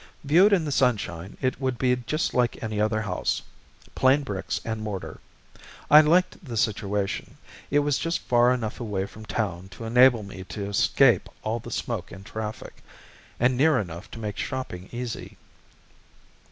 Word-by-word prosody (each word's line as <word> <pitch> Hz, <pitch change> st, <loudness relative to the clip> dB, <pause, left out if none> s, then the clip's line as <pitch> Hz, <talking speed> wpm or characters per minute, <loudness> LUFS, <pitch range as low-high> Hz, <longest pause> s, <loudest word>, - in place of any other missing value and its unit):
Viewed 175 Hz, +9 st, +5 dB
in 180 Hz, -5 st, +3 dB
the 145 Hz, -, -2 dB
sunshine, 100 Hz, -10 st, 0 dB
it 130 Hz, 0 st, -1 dB
would 130 Hz, -2 st, -1 dB
be 125 Hz, +1 st, +2 dB
just 125 Hz, +6 st, -2 dB
like 120 Hz, -1 st, 0 dB
any 110 Hz, -1 st, -2 dB
other 110 Hz, 0 st, +1 dB
house 90 Hz, -4 st, -1 dB, 0.5 s
plain 135 Hz, +3 st, +3 dB
bricks 100 Hz, -8 st, -3 dB
and 110 Hz, -1 st, -3 dB
mortar. 105 Hz, -3 st, -5 dB, 0.7 s
I 150 Hz, +1 st, +11 dB
liked 175 Hz, +5 st, +2 dB
the 120 Hz, -7 st, -5 dB
situation; 105 Hz, -2 st, -1 dB, 0.3 s
it 145 Hz, -, +2 dB
was 145 Hz, -2 st, +1 dB
just 165 Hz, -1 st, 0 dB
far 120 Hz, 0 st, +4 dB
enough 115 Hz, -4 st, -2 dB
away 105 Hz, -5 st, -2 dB
from 110 Hz, +2 st, -12 dB
a -, -, -23 dB
town 95 Hz, -5 st, -3 dB
to -, -, -8 dB
enable 120 Hz, 0 st, +5 dB
me 100 Hz, -1 st, -8 dB
to 100 Hz, +1 st, -5 dB
escape 115 Hz, +1 st, +3 dB
all 110 Hz, +2 st, -1 dB
the 120 Hz, -, -9 dB
smoke 115 Hz, -4 st, -4 dB
and 95 Hz, +2 st, -11 dB
traffic, 110 Hz, 0 st, -7 dB, 0.6 s
and 125 Hz, +2 st, +3 dB
near 150 Hz, +2 st, +4 dB
enough 90 Hz, -5 st, -5 dB
to 115 Hz, -, -9 dB
make 105 Hz, -2 st, -5 dB
shopping 95 Hz, -9 st, -5 dB
easy. 120 Hz, -1 st, -6 dB
115 Hz, 165 wpm, -26 LUFS, 105-130 Hz, 0.7 s, I